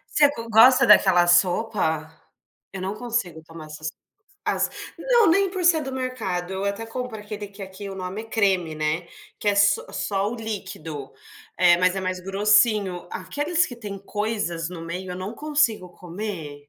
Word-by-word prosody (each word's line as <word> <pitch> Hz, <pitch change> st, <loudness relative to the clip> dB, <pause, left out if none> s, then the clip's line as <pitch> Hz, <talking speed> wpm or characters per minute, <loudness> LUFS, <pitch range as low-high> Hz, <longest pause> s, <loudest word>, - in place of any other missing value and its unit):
Você 290 Hz, -2 st, +6 dB
go 230 Hz, -4 st, -7 dB
gosta 235 Hz, +4 st, +7 dB
daquela 180 Hz, -5 st, +6 dB
sopa? 175 Hz, -3 st, +2 dB, 0.7 s
Eu 190 Hz, -1 st, -6 dB
não 195 Hz, +2 st, -3 dB
consigo 220 Hz, -8 st, -3 dB
tomar 165 Hz, -1 st, -11 dB
essas 155 Hz, 0 st, -8 dB, 0.4 s
sopas, -, -, -2 dB
as -, -, -20 dB, 0.3 s
não, 475 Hz, -5 st, +4 dB
nem 390 Hz, +3 st, +3 dB
por 370 Hz, -2 st, -4 dB
ser 325 Hz, -3 st, +5 dB
do 265 Hz, -1 st, -5 dB
mercado, 215 Hz, -9 st, -3 dB
eu 190 Hz, +1 st, -3 dB
até 200 Hz, +3 st, -2 dB
compro 235 Hz, -1 st, -5 dB
aquele 210 Hz, 0 st, -7 dB
que 200 Hz, 0 st, -11 dB
aqui 190 Hz, +1 st, -8 dB
o 195 Hz, -, -7 dB
nome 185 Hz, +3 st, -5 dB
é -, -, -11 dB
creme, 190 Hz, -7 st, 0 dB
né, 155 Hz, +3 st, -2 dB, 0.3 s
que 205 Hz, -, -1 dB
é -, -, +4 dB
s 200 Hz, 0 st, +4 dB, 0.2 s
só 200 Hz, 0 st, -1 dB
o 240 Hz, -, -4 dB
líquido, 165 Hz, -, -6 dB, 0.5 s
eh, 175 Hz, -1 st, +6 dB
mas 185 Hz, 0 st, +3 dB
é -, -, -1 dB
mais 185 Hz, -1 st, -3 dB
grossinho, 200 Hz, -1 st, +2 dB
aqueles 295 Hz, -, 0 dB
que 245 Hz, -, -8 dB
têm 205 Hz, -4 st, -7 dB
coisas 200 Hz, -5 st, -3 dB
no 180 Hz, -2 st, -8 dB
meio 180 Hz, +2 st, -6 dB
eu -, -, -6 dB
não 185 Hz, +4 st, -5 dB
consigo 290 Hz, -11 st, 0 dB
comer. 180 Hz, -4 st, -6 dB
200 Hz, 180 wpm, -24 LUFS, 180-225 Hz, 0.7 s, gosta